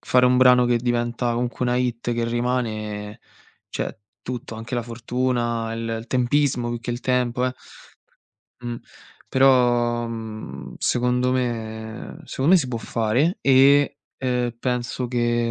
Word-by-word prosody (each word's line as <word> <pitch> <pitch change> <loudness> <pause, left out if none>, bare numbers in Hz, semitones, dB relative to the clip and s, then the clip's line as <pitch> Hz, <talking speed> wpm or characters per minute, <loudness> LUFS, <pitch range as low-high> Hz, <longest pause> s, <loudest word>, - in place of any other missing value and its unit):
fare 125 0 +4
un 125 0 +4
brano 125 -1 +6
che 120 - +3
diventa 120 0 0
comunque 120 +1 -2
una 125 0 +1
hit 120 -1 -1
che 115 0 -1
rimane, 110 -4 -2 0.5
cioè - - -4 0.2
tutto, 120 0 -6
anche 115 +3 -6
la 120 - 0
fortuna 120 -1 -1
e - - -4 0.2
il 110 - -8
tempismo 125 -1 +1
più 120 0 -3
che 120 - -5
il 120 0 -3
tempo, 125 -1 +1
eh. 130 - -1 1.1
Mh. 120 -1 -4 0.5
Però, 120 -3 +3
mhmm, 110 - -7
secondo 125 +1 +1
me 110 -3 -4
secondo 140 +7 +1
me - - +9
si 135 -6 -2
può 120 -2 -3
fare 120 - 0
e, 140 +1 +5 0.2
ehm, 125 -2 -1
penso 125 0 -2
che, 120 -1 +1
120 Hz, 145 wpm, -23 LUFS, 115-125 Hz, 1.1 s, me